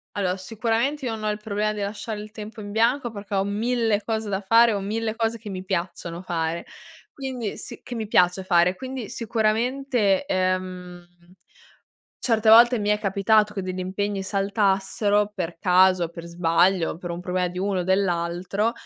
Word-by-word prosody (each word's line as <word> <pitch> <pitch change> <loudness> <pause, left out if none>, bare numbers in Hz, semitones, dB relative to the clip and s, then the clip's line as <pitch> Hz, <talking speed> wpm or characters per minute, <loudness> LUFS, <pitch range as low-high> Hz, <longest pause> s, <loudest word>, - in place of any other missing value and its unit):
Allora, 185 -3 0
sicuramente 230 +8 -1
io 240 - -1
non 215 -1 -6
ho - - +1
il 210 - -1
problema 210 0 -2
di 210 - -5
lasciare 210 +1 -4
il 210 0 -10
tempo 215 0 -9
in 205 0 -7
bianco 240 +3 +1
perché 200 -1 -6
ho 195 - +2
1000 220 +1 0
cose 220 -1 -2
da 195 0 -1
fare, 230 +3 +5
ho 200 - -1
1000 220 +3 -2
cose 230 0 -1
che 215 -1 -9
mi 185 -1 -5
piacciono 175 -2 -4
fare, 170 -1 -2 0.5
quindi 255 -6 -4
si 240 - -8
che 245 - -8
mi 225 -2 -4
piace 180 -1 +3
fare, 180 0 +3
quindi 260 -1 -6
sicuramente, 230 0 0
ehm, 185 -3 -2 1.2
certe 225 -2 +1
volte 235 +2 +8
mi 205 0 0
è 210 - +3
capitato 210 +1 +2
che 195 - -3
degli 185 0 -4
impegni 195 +2 -2
saltassero 200 +1 +1
per 175 -4 -4
caso, 185 -1 +4
per 170 0 -9
sbaglio, 170 +1 +2
per 175 +1 -7
un 170 0 -4
problema 180 0 -1
di 180 +1 -7
uno 195 0 0
o - - -1
dell'altro 185 +2 0
200 Hz, 175 wpm, -24 LUFS, 185-225 Hz, 1.2 s, volte